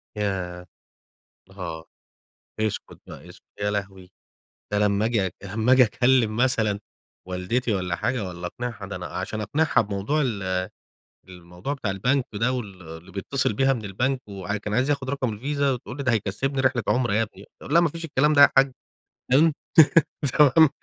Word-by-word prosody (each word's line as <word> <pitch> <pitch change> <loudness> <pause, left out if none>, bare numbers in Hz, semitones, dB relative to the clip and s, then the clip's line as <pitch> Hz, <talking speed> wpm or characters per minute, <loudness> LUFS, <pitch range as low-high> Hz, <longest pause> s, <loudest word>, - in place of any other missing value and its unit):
ياه! 95 -4 -3 0.9
أها، 85 -4 -7 0.8
اسكت 110 -1 -2
بقى، - - -11
اسكت، - - -15 0.2
يا 105 0 0
لهوي! 95 -2 -5 0.6
ده 105 - +2
لمّا 105 0 +2
آجي 110 -4 +1
أك 90 - -6
لما 110 +5 +1
آجي 130 -1 +7
أكلم 120 -1 +2
مثلًا 110 -5 +1 0.5
والدتي 100 +6 -1
والّا 90 -2 -2
حاجة 120 0 -1
والّا 90 0 -6
أقنعها 120 0 -6
ده 100 - -6
أنا - - -6
عشان 110 - -4
أقنعها 145 +10 +2
بموضوع 105 +8 -1
ال 95 -7 -1 0.6
الموضوع 90 +7 -7
بتاع 120 -8 -3
البنك 125 +7 +1
ده 115 +5 +1
وال 105 -7 -5
اللي 80 0 -11
بيتصل 110 +5 -1
بيها 135 +5 +3
من 115 -4 -5
البنك، 125 +7 -1
وع 100 0 -4
و - - -3
كان 105 0 -5
عايز 125 +5 +1
ياخد 140 -3 -1
رقم 130 -5 -1
الفيزا 140 +5 0
وتقول 125 0 -5
لي: 140 - -4
"ده 125 - +2
هيكسبني 115 +6 -1
رحلة 130 -3 +1
عمرة 125 -4 +1
يا 110 +2 +3
ابني"، 110 - -11 0.2
اقول - - -5
لها: 170 - +7
"ما 170 - +2
فيش 165 +2 -6
الكلام 150 0 +2
ده 145 - +5
يا 140 - +9
حاجة" 135 -1 +5 0.6
فاهم، 155 +4 +5 0.8
تمام، 150 +1 +7
110 Hz, 175 wpm, -24 LUFS, 100-130 Hz, 0.9 s, يا